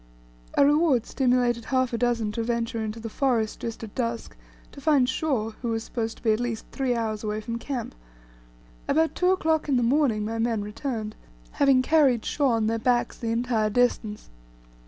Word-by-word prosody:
A 280 - +5
reward 290 -5 +3
stimulated 245 -3 +1
half 255 -1 0
a - - 0
dozen 235 -3 0
to 230 - -3
venture 230 -1 -2
into 215 +1 -4
the 225 - -6
forest 230 -2 0
just 230 0 -5
at 215 - -8
dusk 235 -2 -3 0.4
to 280 - -12
find 275 -4 +3
Shaw, 260 -5 -1
who 240 - -3
was 225 0 -1
supposed 225 -2 -4
to - - -20
be 225 - +3
at 215 - +1
least 240 -2 -3
three 260 -3 0
hours 220 -2 -2
away 210 0 -2
from 230 +2 -5
camp. 250 -2 -4 0.9
About 320 +2 +2
two 360 - +1
o'clock 320 -5 +1
in 270 - +3
the 245 - +2
morning 235 -4 +2
my 225 +1 -3
men 225 -2 0
returned, 215 0 -4 0.4
having 270 -2 +3
carried 275 -6 +3
Shaw 285 -2 +1
on 225 -1 +1
their 225 +1 0
backs 240 +1 0
the 230 - -3
entire 230 -2 +1
distance. 220 - 0
235 Hz, 190 wpm, -26 LUFS, 225-265 Hz, 0.9 s, A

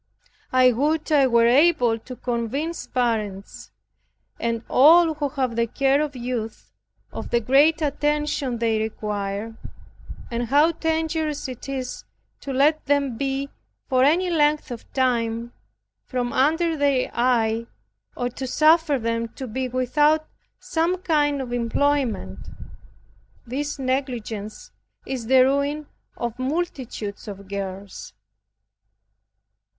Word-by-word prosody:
I 255 -1 +5
would 305 +6 0
I 280 -3 +5
were 235 -2 +4
able 245 -3 +4
to 255 +3 -9
convince 250 +8 -3
parents, 210 - -2 0.7
and 230 0 -2
all 325 +4 +6
who 295 -2 -2
have 260 -4 -2
the 235 0 +1
care 275 +4 +2
of 295 -2 -3
youth, 240 -3 -5 0.4
of - - -6
the 235 - +2
great 290 +7 +3
attention 295 -3 -1
they 225 -1 +1
require, 210 0 -3 0.8
and 235 0 -2
how 295 +6 +4
dangerous 320 -2 -2
it 255 +1 -8
is 260 -2 -4 0.4
to 275 - -6
let 295 +4 +3
them 280 -3 +1
be 275 +2 -2 0.4
for 255 -1 +3
any 350 +6 +3
length 300 -3 +2
of 235 - -8
time 235 -2 0 0.5
from 245 -2 -2
under 320 +5 +2
their 280 -3 +1
eye, 230 -2 +1 0.5
or 245 - -1
to 260 +2 -6
suffer 310 +1 +4
them 230 -1 -2
to 265 - -6
be 255 +2 -3
without 295 +5 +2 0.3
some 335 +3 0
kind 295 -5 +1
of 250 -2 -5
employment. 235 - -1 1.0
This 285 +5 -3
negligence 245 -6 -4 0.3
is 250 -4 -4
the 260 0 +6
ruin 280 +3 0 0.3
of 235 0 -4
multitudes 260 - -4
of 200 -1 -8
girls. 195 0 -6
260 Hz, 120 wpm, -23 LUFS, 230-295 Hz, 1.0 s, all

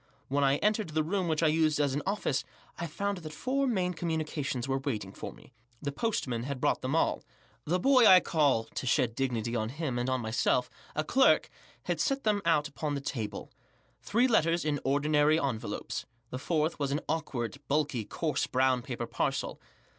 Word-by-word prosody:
When 140 +1 +1
I 135 0 +4
entered 210 -3 +1
the 155 0 0
room 185 +3 -1
which 160 0 0
I - - +5
used 155 -1 +2
as 145 -2 +2
an 145 - -1
office, 195 -9 0 0.4
I 170 - -2
found 200 +4 -2
that 155 -2 -8
four 265 - -1
communication? 160 - -1
were 135 0 +1
awaiting 110 -8 -3
roe. - - -5 0.4
The 140 - -3
postman 140 - -1
had 135 +2 -4
brought - - +1
them 130 +4 -1
all. 165 - +1 0.4
The 175 +4 +1
boy 255 +1 +6
I 185 -1 +9
call— 145 -10 +2
to 130 - -6
shed 120 -1 +2
dignity 120 -2 -1
on 110 -1 -1
him 135 -2 -3
and 125 +1 -1
on 130 0 +1
myself— 120 +2 +1 0.2
a 155 - +1
clerk* 265 - +4 0.3
had - - -2
$et 275 -1 0
them 210 -2 +2
out 155 -3 +3
upon 145 +1 -3
the - - -2
table* 110 -7 -5 0.5
Three 235 +5 +2
letters 170 -8 +2
in 145 -2 0
ordinary 150 +3 +3
envelopes. 130 -7 -3 0.2
The 130 - -4
fourth 155 +1 0
was 140 -1 -1
an 145 +3 0
awkward* 140 -5 -3
bulky* 140 -5 0
coarse 150 +7 -1
brown 130 -1 +2
paper 120 -2 -4
parcel. - - -2
150 Hz, 185 wpm, -30 LUFS, 130-170 Hz, 0.5 s, I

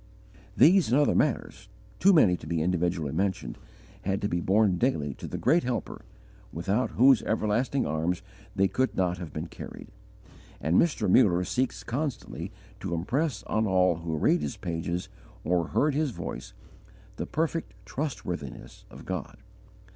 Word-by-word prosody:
These 175 - +6
and 130 - +5
other 145 - +3
matters, 110 -7 -1 0.3
too 195 - +6
many 110 - +5
to 75 - -11
be 85 0 -1
individually 85 -3 0
mentioned, 95 -7 -2 0.4
had 95 +1 -1
to - - +2
be 85 -3 -1
borne 95 -1 +3
daily 75 - 0
to - - -8
the - - -4
great 170 +2 +3
Helper, 120 -5 -3 0.5
without 100 +9 0
whose 130 -1 +6
Everlasting 115 +5 0
Arms 80 +4 -1 0.3
they 95 0 +3
could 130 +8 0
not 90 -1 +1
have 85 -3 -7
been 75 +2 -4
carried. - - -10 0.7
And 80 +5 0
Mr. 170 -3 0
Muller 90 -7 +5
seeks 130 +7 -1
constantly 135 0 -4 0.3
to 85 - -3
impress 125 - -1
on 110 0 0
all 90 -2 +3
who 80 -1 -3
read 165 - +3
his 110 - -4
pages 85 -1 -3 0.4
or 85 0 +1
heard 150 0 +1
his 150 +1 +1
voice, 85 -8 -7 0.6
the - - -4
perfect 165 +1 -2
trustworthiness 90 - -5
of - - -12
God. - - -5
95 Hz, 155 wpm, -28 LUFS, 85-130 Hz, 0.7 s, These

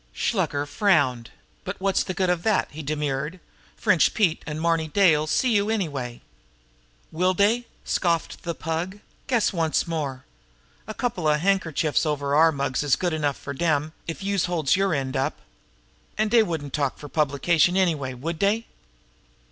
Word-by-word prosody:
Shluker 145 0 -1
frowned. 145 - +1 0.3
"But 195 - -5
what's 195 0 +1
the 185 - -4
good 185 -2 +1
of 175 -2 -1
that?" 215 +1 +1
he 155 - -7
demurred. 150 +2 -3 0.4
"French 185 -7 +3
Pete 185 -8 +2
and 150 0 -4
Marny 165 -1 +1
Day 180 0 +4
'll 150 +1 -1
see 245 +10 +2
you 205 +1 +2
anyway." 140 - -3 0.9
"Will 185 +3 +1
dey!" 225 +5 +2 0.2
scoffed 170 -3 0
the 170 -1 -4
Pug. 165 +4 -3 0.3
"Guess 240 -6 +2
once 165 -3 +1
more! 145 -6 -4 0.6
A 215 - -6
coupla 175 -11 0
handkerchiefs 165 -4 +1
over 145 -3 -1
our 160 +2 +6
mugs 140 -3 -1
is 145 -3 +3
good 175 -3 -1
enough 145 -3 -1
fer 140 - -7
dem, 155 0 0
if 165 +4 -5
youse 200 -2 +1
holds 170 -6 +1
yer 195 0 +1
end 135 -2 -2
up. 135 - -1 0.8
An' 215 0 +1
dey 230 +1 +6
wouldn't 160 -9 -3
talk 140 -3 -1
fer 145 - -9
publication, 155 +4 +2
anyway, 150 -9 0
would 160 +6 -4
dey?" 215 +3 +1
165 Hz, 165 wpm, -24 LUFS, 145-190 Hz, 0.9 s, our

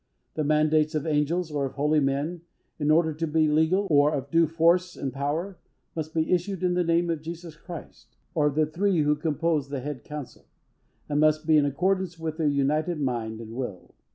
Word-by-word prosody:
The 155 - -1
mandates 155 +1 +2
of 155 0 -1
angels, 155 +2 0
or 140 -2 -1
of - - -11
holy 150 +2 +2
men, 145 +5 -1 0.4
in 145 0 0
order 160 0 +3
to 165 +2 -3
be 155 0 +2
legal, 160 +6 +2
or 145 0 +5
of 140 -2 -4
due 165 0 +4
force 170 +3 +2
and 135 -3 -4
power, 155 +7 -3 0.4
must 160 0 -5
be 160 -1 0
issued 185 +1 -1
in 180 -1 +2
the 180 0 +2
name 170 0 +1
of 160 -2 -3
Jesus 165 0 -8
Christ, 170 +1 -10 0.3
or 150 -4 +2
of 145 - -1
the 155 0 +3
three 175 +2 +1
who 150 0 +3
compose 155 -1 -1
the 140 -2 -4
Head 145 0 -6
Council; 150 -3 -9 0.6
and 145 -1 0
must 155 0 +3
be 160 -1 +4
in 150 -1 +5
accordance 185 +4 0
with 160 -1 -4
their 160 -3 +1
united 150 +4 +1
mind 115 -5 -2
and 115 0 -9
will. 120 -7 -6
155 Hz, 205 wpm, -26 LUFS, 145-170 Hz, 0.6 s, or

